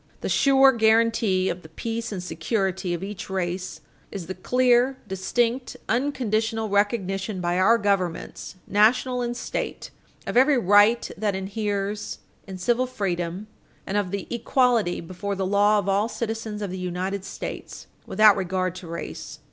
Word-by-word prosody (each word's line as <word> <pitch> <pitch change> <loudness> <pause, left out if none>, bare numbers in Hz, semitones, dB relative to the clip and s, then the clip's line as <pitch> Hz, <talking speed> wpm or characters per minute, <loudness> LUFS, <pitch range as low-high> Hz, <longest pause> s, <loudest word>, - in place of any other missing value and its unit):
The - - -3
sure 270 -1 +5
guarantee 225 -4 +3
of 180 0 -3
the 160 - -14
peace 225 +7 -4
and 185 -3 -4
security 180 +1 -1
of 170 - -6
each 200 -1 -6
race 185 -1 -3 0.3
is 190 -4 -6
the 185 - -5
clear, 250 +3 +2
distinct, 235 +6 -1
unconditional 225 -4 0
recognition 200 -1 0
by 175 0 0
our 225 +5 +5
governments, 195 -5 -2
National 245 +5 +3
and 240 0 -2
State, - - -4 0.3
of - - -4
every 265 +3 +5
right 205 +2 +4
that 205 -1 0
inheres 200 +1 -3 0.3
in 190 -1 -7
civil 240 +7 +1
freedom, 185 -4 -3 0.4
and 195 - -4
of 205 -3 0
the 200 0 -4
equality 235 -5 +1
before 185 +4 -5
the 190 0 -2
law 205 +2 +3
of 200 - -1
all 200 +3 +2
citizens 225 -2 -4
of 195 - -4
the 185 - -5
United 185 +2 -3
States, - - -7 0.2
without 215 0 +6
regard 185 -2 -1
to 180 - -9
race. 170 +1 -7
205 Hz, 150 wpm, -24 LUFS, 185-230 Hz, 0.4 s, without